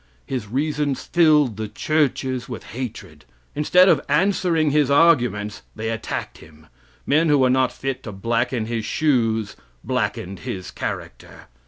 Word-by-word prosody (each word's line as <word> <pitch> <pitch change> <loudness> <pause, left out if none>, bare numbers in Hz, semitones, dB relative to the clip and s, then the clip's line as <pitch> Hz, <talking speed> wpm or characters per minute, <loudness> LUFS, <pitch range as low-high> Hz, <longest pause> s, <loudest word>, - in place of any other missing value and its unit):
His 125 -6 -4
reasons 145 +3 -1
filled 150 - +3
the 110 0 -3
churches 130 -1 -1
with 120 - -6
hatred. 125 -2 -7 0.3
Instead 180 +5 +4
of 155 -7 +4
answering 165 -1 +2
his 145 -2 +2
arguments 125 -9 +3
they 110 +1 -3
attacked 115 - -5
him. 80 0 -17 0.4
Men 160 +2 +3
who 145 - +5
were 130 -2 +3
not 130 -1 +2
fit 135 -1 -4
to 110 - -7
blacken 115 +3 -1
his 115 -1 -3
shoes 115 -5 0 0.3
blackened 95 +1 -2
his 90 +2 -6
character. - - -7
130 Hz, 140 wpm, -22 LUFS, 110-150 Hz, 0.4 s, who